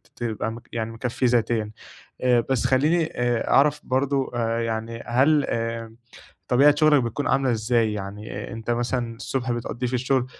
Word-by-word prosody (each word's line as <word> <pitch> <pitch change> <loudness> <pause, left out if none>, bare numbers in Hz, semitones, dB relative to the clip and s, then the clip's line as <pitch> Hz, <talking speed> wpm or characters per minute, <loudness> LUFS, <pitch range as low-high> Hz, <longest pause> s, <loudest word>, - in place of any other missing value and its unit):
تبقى 115 -2 -3
م 115 - -8
يعني 115 -1 -3
مكفِّيه 125 +2 -1
ذاتيًا، 115 -3 +1 0.5
آآ 125 -1 +4
بس 130 -3 +1
خلّيني 155 +6 +3
أ 120 -5 -1
أعرف 145 +1 +4
برضه 135 +1 0
آآ 115 -1 0
يعني 115 0 -3
هل 140 +5 +3
آآ، 115 -1 -3 0.5
طبيعة 140 +4 +5
شُغلَك 150 -4 +5
بتكون 120 +5 -2
عاملة 135 -1 +2
إزاي 115 0 +1
يعني 105 +1 -6
أنت 115 +1 -5
مثلًا 120 -1 -1
الصُبح 125 +1 -2
بتقضّيه 120 +1 -3
في 125 - -3
الشغل، 125 0 +1
120 Hz, 155 wpm, -24 LUFS, 115-130 Hz, 0.5 s, طبيعة